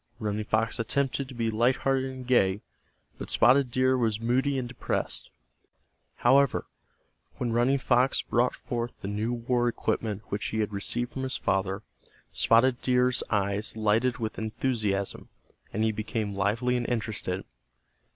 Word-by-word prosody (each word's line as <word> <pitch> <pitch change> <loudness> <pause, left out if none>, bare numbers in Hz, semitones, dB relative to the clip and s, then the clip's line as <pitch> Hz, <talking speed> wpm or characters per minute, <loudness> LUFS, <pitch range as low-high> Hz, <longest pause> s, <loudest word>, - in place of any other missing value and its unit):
Running 105 -2 -2
Fox 115 +2 0
attempted 135 +3 0
to 130 - -9
be 115 -1 0
light 120 +4 +3
hearted 135 0 0
and 130 -1 -8
gay, 105 -5 +2 0.6
but - - -6
Spotted 130 +2 +5
Deer 130 +2 +2
was 115 -4 0
moody 130 +4 +1
and 125 -2 -2
depressed. 125 - -3 0.9
However, 135 +3 +3 0.7
when 120 -2 -2
Running 125 +4 +3
Fox 130 0 +2
brought 120 +1 +1
forth 120 0 -4
the - - -5
new 105 +3 -1
war 120 0 0
equipment 110 -3 -2
which 100 - -2
he 110 - -2
had 105 -1 -1
received 120 +5 -2
from 135 - -4
his 130 0 -2
father, 95 +1 -1 0.5
Spotted 120 +2 +3
Deer's 125 0 +2
eyes 100 +1 -1
lighted 110 +3 +2
with 110 -2 -4
enthusiasm, 110 -3 -1 0.4
and 110 - -1
he 110 - +3
became 110 -1 -3
lively 110 +6 +1
and 120 - -2
interested. 105 -5 -2
115 Hz, 150 wpm, -28 LUFS, 110-125 Hz, 0.9 s, Spotted